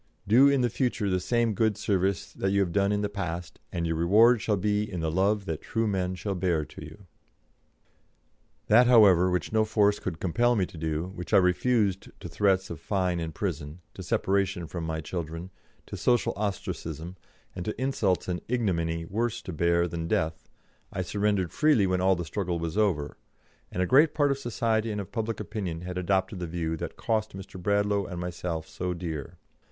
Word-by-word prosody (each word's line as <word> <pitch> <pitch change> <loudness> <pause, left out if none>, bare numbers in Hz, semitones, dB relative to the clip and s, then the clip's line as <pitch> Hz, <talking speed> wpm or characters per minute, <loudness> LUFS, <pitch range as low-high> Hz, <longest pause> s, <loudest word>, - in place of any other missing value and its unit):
Do 125 +7 +7
in 140 -2 +3
the 120 - +2
future 120 -6 0
the 90 - +2
same 115 +3 +1
good 110 0 +1
service 95 -2 0
that 95 - -1
you 100 +1 +2
have 90 -3 0
done 100 +2 +2
in 105 0 0
the - - +1
past, 90 -4 -5
and 85 -1 -2
your 80 -1 -1
reward 110 +8 +5
shall 105 -2 +1
be 105 +2 0
in 90 - -4
the 80 -1 -1
love 100 +3 +1
that 80 -3 -4
true 115 0 -1
men 95 -3 -1
shall 100 +2 -3
bear 85 -4 0
to - - -11
you." 100 -1 -12 1.6
That, 120 +3 +6
however, 100 -7 +6
which 90 +4 -2
no 110 0 +4
force 105 -1 +2
could 85 -4 -5
compel 120 +7 +2
me 95 -4 +2
to 85 - -12
do, 80 +3 -2
which 90 -3 -2
I - - +9
refused 100 +2 +2
to - - -7
threats 95 -2 +1
of 80 - -6
fine 90 -2 -1
and 80 -1 -3
prison, 80 -2 -4
to - - -9
separation 95 0 0
from 85 +1 -5
my 80 0 -3
children, 85 +2 -5 0.3
to - - -7
social 120 -1 +2
ostracism, 90 -4 -4 0.4
and 90 - -4
to 110 - -4
insults 115 -9 0
and 90 -1 -2
ignominy 85 -9 -1
worse 115 +6 -1
to 95 - -6
bear 85 +2 +2
than 80 -1 -4
death, 80 -1 -1 0.4
I 95 - -2
surrendered 100 -2 0
freely 150 -10 +4
when 90 -1 0
all 95 0 +4
the 85 -1 -4
struggle 90 0 -2
was 85 +1 -4
over, 90 -9 0 0.5
and 90 - 0
a - - +1
great 145 - +5
part 145 -2 +3
of 140 - -1
society 115 -3 0
and 105 - -3
of 100 - -6
public 115 -2 -3
opinion 95 -6 -4
had 90 +1 -4
adopted 95 +1 0
the 90 - -3
view 80 -1 -2
that - - -6
cost 110 -3 -1
Mr. 95 -1 -9
Bradlaugh 100 +1 +1
and 90 -2 -6
myself 85 -2 -4
so 90 0 -3
dear. 85 -1 -6
95 Hz, 200 wpm, -27 LUFS, 85-105 Hz, 1.6 s, I